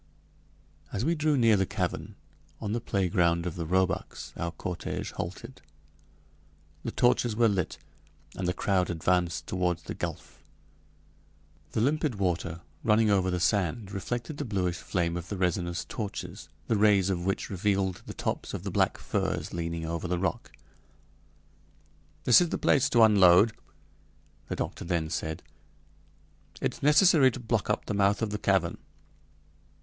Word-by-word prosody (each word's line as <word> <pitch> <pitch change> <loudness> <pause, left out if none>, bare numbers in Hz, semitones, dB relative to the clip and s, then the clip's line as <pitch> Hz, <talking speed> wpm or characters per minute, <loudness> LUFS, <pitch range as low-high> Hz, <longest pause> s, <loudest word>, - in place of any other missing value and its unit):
As 105 +5 -2
we 165 - +2
drew 155 -2 +1
near 115 -3 +5
the 95 -2 +1
cavern, - - -3 0.4
on 105 -2 -4
the 120 - -1
playground 85 -5 +1
of 90 - -2
the 85 -2 -5
roebucks, 95 +2 -1
our 85 0 -3
cortége 90 +1 -5
halted. 95 +9 -7 1.2
The - - -3
torches 120 -2 +2
were 115 +1 +4
lit, 95 -5 -1 0.6
and 95 - -3
the 90 - +1
crowd 95 -3 +1
advanced 85 -1 0
toward 90 -2 0
the - - -5
gulf. - - -6 1.3
The - - +1
limpid 145 0 +1
water, 85 -3 -2 0.2
running 110 0 +4
over 95 -2 +2
the 90 0 -1
sand, 100 +2 0
reflected 120 - -4
the 145 - -2
bluish 95 -7 -1
flame 85 -3 -1
of 85 0 -6
the 100 - -4
resinous 90 -1 -1
torches, 105 -3 -6 0.2
the 115 - +1
rays 100 -2 +4
of 85 -2 -2
which 95 +3 -2
revealed 95 -1 0
the - - -7
tops - - -3
of - - -6
the - - -4
black - - +1
firs - - -2
leaning 85 -1 -3
over 85 +2 -3
the 90 0 0
rock. 95 +6 -2 1.7
"This 120 - +7
is 175 - +1
the - - -1
place 135 -2 +3
to 120 -2 +5
unload," 100 0 +6 0.9
the - - -3
doctor - - -4
then 85 -3 -1
said. 80 0 -3 1.2
"It's - - -3
necessary 150 -1 +6
to 130 - -7
block 115 -3 -1
up - - 0
the - - -3
mouth 100 +2 +2
of 110 - -1
the 105 - -3
cavern." 95 -5 +1
95 Hz, 155 wpm, -28 LUFS, 90-115 Hz, 1.7 s, This